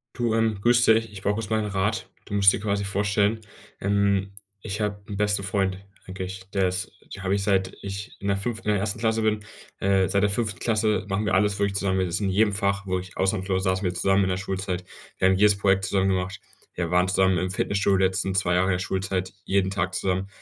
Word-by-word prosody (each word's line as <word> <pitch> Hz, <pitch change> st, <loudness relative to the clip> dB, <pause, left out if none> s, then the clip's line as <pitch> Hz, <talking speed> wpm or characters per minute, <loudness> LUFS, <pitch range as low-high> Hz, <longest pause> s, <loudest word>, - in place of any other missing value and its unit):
Du, 120 Hz, -2 st, 0 dB
ähm, 110 Hz, -2 st, +1 dB
grüße 120 Hz, 0 st, +5 dB
dich, 115 Hz, -1 st, -1 dB
ich 100 Hz, -2 st, -9 dB
brauche 100 Hz, +1 st, +1 dB
kurz 110 Hz, -1 st, -4 dB
mal 110 Hz, 0 st, +1 dB
'n -, -, -3 dB
Rat. 100 Hz, +3 st, -1 dB, 0.2 s
Du -, -, -8 dB
musst 100 Hz, -1 st, +6 dB
dir -, -, -2 dB
quasi 100 Hz, -1 st, -1 dB
vorstellen, 105 Hz, +2 st, +1 dB, 0.4 s
ähm, 100 Hz, -1 st, +1 dB, 0.3 s
ich 105 Hz, +1 st, -4 dB
habe 105 Hz, -1 st, -2 dB
'n 100 Hz, -, -5 dB
besten 105 Hz, -1 st, +1 dB
Freund 95 Hz, -1 st, 0 dB, 0.3 s
eigentlich, 95 Hz, 0 st, -7 dB
der 95 Hz, -2 st, +2 dB
ist 90 Hz, +1 st, -4 dB, 0.2 s
den 95 Hz, -, -9 dB
habe 95 Hz, +1 st, +1 dB
ich 100 Hz, -, -1 dB
seit 95 Hz, -2 st, +1 dB
ich 100 Hz, +3 st, -6 dB
in 100 Hz, -, -5 dB
der 100 Hz, -, +2 dB
5. 110 Hz, +3 st, -4 dB
in -, -, +4 dB
der 105 Hz, -, +1 dB
1. 110 Hz, +2 st, -2 dB
Klasse 110 Hz, 0 st, +1 dB
bin. 110 Hz, -1 st, +1 dB, 0.4 s
Äh, 95 Hz, -1 st, +2 dB
seit 100 Hz, 0 st, +2 dB
der 105 Hz, -, +3 dB
5. 105 Hz, -1 st, -2 dB
Klasse 110 Hz, -3 st, +1 dB
machen 100 Hz, +2 st, -1 dB
wir 95 Hz, -, +1 dB
alles 100 Hz, +1 st, +2 dB
wirklich 100 Hz, -1 st, 0 dB
zusammen. 95 Hz, -1 st, 0 dB
Das 90 Hz, -2 st, -1 dB
ist -, -, 0 dB
in 100 Hz, -, 0 dB
jedem 105 Hz, +3 st, +3 dB
Fach 100 Hz, 0 st, -1 dB
wo 95 Hz, -1 st, -1 dB
ich 90 Hz, 0 st, -10 dB
ausnahmslos 95 Hz, -1 st, 0 dB
saßen 95 Hz, 0 st, 0 dB
wir 90 Hz, -, 0 dB
zusammen 95 Hz, +2 st, +2 dB
in 95 Hz, -, 0 dB
der 90 Hz, -, +1 dB
Schulzeit, 95 Hz, -1 st, -3 dB, 0.3 s
wir 95 Hz, -, +4 dB
haben 95 Hz, -, +4 dB
jedes 105 Hz, +1 st, +4 dB
Projekt 95 Hz, -1 st, +2 dB
zusammen 95 Hz, 0 st, +1 dB
gemacht. 95 Hz, +1 st, -2 dB, 0.3 s
Wir 85 Hz, -1 st, -3 dB
waren 90 Hz, +1 st, +3 dB
zusammen 95 Hz, 0 st, +3 dB
im 90 Hz, 0 st, -1 dB
Fitnessstudio 100 Hz, +1 st, +1 dB
die 95 Hz, -, +2 dB
letzten 95 Hz, 0 st, -1 dB
2 90 Hz, -2 st, +2 dB
Jahre 95 Hz, +2 st, +2 dB
der 90 Hz, -, 0 dB
Schulzeit, 95 Hz, 0 st, -2 dB
jeden 95 Hz, -1 st, +1 dB
Tag 95 Hz, -1 st, -1 dB
zusammen. 95 Hz, 0 st, -1 dB
100 Hz, 240 wpm, -25 LUFS, 95-105 Hz, 0.4 s, musst